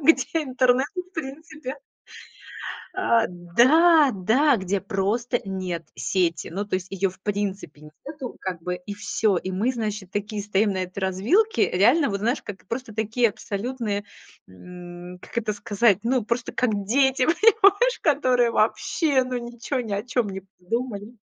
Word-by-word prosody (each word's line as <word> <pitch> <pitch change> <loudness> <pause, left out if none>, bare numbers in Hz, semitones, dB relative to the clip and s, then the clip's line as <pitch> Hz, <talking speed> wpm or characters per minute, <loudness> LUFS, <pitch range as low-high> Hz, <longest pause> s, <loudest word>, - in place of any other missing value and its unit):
где 325 +3 +4 0.2
интернет 255 -1 +2
в 365 +1 -5
принципе 300 -2 -7 1.2
а, 235 -12 +2
да, 265 - +5
да, 240 +9 +3
где 190 0 -1
просто 220 +5 -1
нет 185 -4 -4
сети. 175 -3 -1
Ну, 195 +5 -3
то 205 - -3
есть 185 0 -2
её 195 0 0
в 190 - -19
принципе 195 -7 -4 0.2
нету 280 -4 -7
как 185 -3 -4
бы 180 +1 -2
и 180 +3 -8
всё. 205 0 0
И 185 +2 -3
мы, 215 +8 0
значит, 210 -5 -4
такие 205 +1 -3
стоим 205 0 +1
на 190 - -3
этой 185 +2 -7
развилке. 220 - +2
Реально, 245 - +4
вот 200 0 -3
знаешь, 235 +4 0
как 195 -2 -9
просто 235 -2 -5
такие 225 +2 +1
абсолютные, 210 0 -4 0.4
м, 175 - -11
как - - -4
это 215 -2 -1
сказать, 205 0 +2
ну, 245 0 +1
просто 235 +2 -2
как 250 -3 +1
дети, 265 +3 +3
понимаешь, 425 +6 +4
которые 255 -5 +3
вообще, 260 - +1
ну, 255 0 -3
ничего 240 +2 -4
ни 225 -4 -5
о 200 +1 -1
чём 240 -2 -1
не 190 0 -6 0.2
подумали. 220 +3 -4
220 Hz, 155 wpm, -24 LUFS, 195-260 Hz, 1.2 s, да